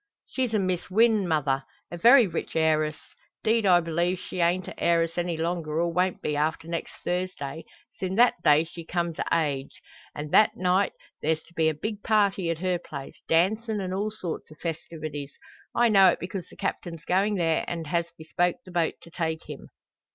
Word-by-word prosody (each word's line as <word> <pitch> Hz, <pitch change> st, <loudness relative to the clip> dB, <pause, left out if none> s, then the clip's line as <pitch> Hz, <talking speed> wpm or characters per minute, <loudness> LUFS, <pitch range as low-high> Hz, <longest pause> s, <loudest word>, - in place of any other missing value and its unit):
"She's 255 Hz, -3 st, -2 dB
a -, -, +4 dB
Miss 185 Hz, -3 st, -1 dB
Wynn, 215 Hz, -1 st, +3 dB
mother. 140 Hz, -4 st, +1 dB, 0.3 s
A 175 Hz, -, -5 dB
very 240 Hz, +5 st, +8 dB
rich 170 Hz, -4 st, -4 dB
heiress. 155 Hz, -1 st, +2 dB, 0.5 s
'Deed 225 Hz, -1 st, +2 dB
I 175 Hz, -2 st, +6 dB
b'lieve 170 Hz, +2 st, 0 dB
she 185 Hz, -, -7 dB
ain't 175 Hz, +1 st, +2 dB
a -, -, -7 dB
heiress 165 Hz, -1 st, +2 dB
any 175 Hz, -1 st, -1 dB
longer, 165 Hz, -1 st, -2 dB
or 170 Hz, 0 st, 0 dB
won't 180 Hz, +1 st, 0 dB
be, 150 Hz, -, -1 dB
after 155 Hz, +2 st, -1 dB
next 170 Hz, 0 st, -4 dB
Thursday, 170 Hz, -4 st, -3 dB, 0.3 s
sin' 190 Hz, 0 st, -3 dB
that 235 Hz, -5 st, +4 dB
day 150 Hz, +1 st, +5 dB
she 170 Hz, +1 st, -9 dB
comes 170 Hz, -1 st, -2 dB
o' -, -, +1 dB
age. 145 Hz, -5 st, -1 dB, 0.4 s
An' 150 Hz, 0 st, -5 dB
that 215 Hz, -, +5 dB
night 185 Hz, +2 st, +2 dB, 0.3 s
there's 160 Hz, +1 st, 0 dB
to 170 Hz, -, -22 dB
be 160 Hz, -1 st, +2 dB
a 155 Hz, -, -2 dB
big 210 Hz, +6 st, -4 dB
party 200 Hz, -5 st, +2 dB
at 165 Hz, -, -1 dB
her 180 Hz, +1 st, 0 dB
place, 140 Hz, -4 st, -9 dB
dancin' 215 Hz, +6 st, +2 dB
an' 185 Hz, -1 st, -3 dB
all 205 Hz, +3 st, -1 dB
sorts 180 Hz, -8 st, -6 dB
o' -, -, -12 dB
festivities. 155 Hz, -3 st, -5 dB, 0.4 s
I 240 Hz, 0 st, +5 dB
know 195 Hz, -4 st, +7 dB
it -, -, 0 dB
because 180 Hz, 0 st, -6 dB
the -, -, -15 dB
Captain's 175 Hz, -4 st, -4 dB
goin' 200 Hz, +3 st, +2 dB
there, 165 Hz, -3 st, +1 dB
an' 165 Hz, -2 st, -4 dB
has 170 Hz, +2 st, 0 dB
bespoke 175 Hz, +2 st, 0 dB
the 185 Hz, -, -11 dB
boat 170 Hz, -2 st, 0 dB
to 170 Hz, -, -14 dB
take 160 Hz, -2 st, -3 dB
him." -, -, -9 dB
170 Hz, 195 wpm, -26 LUFS, 160-190 Hz, 0.5 s, very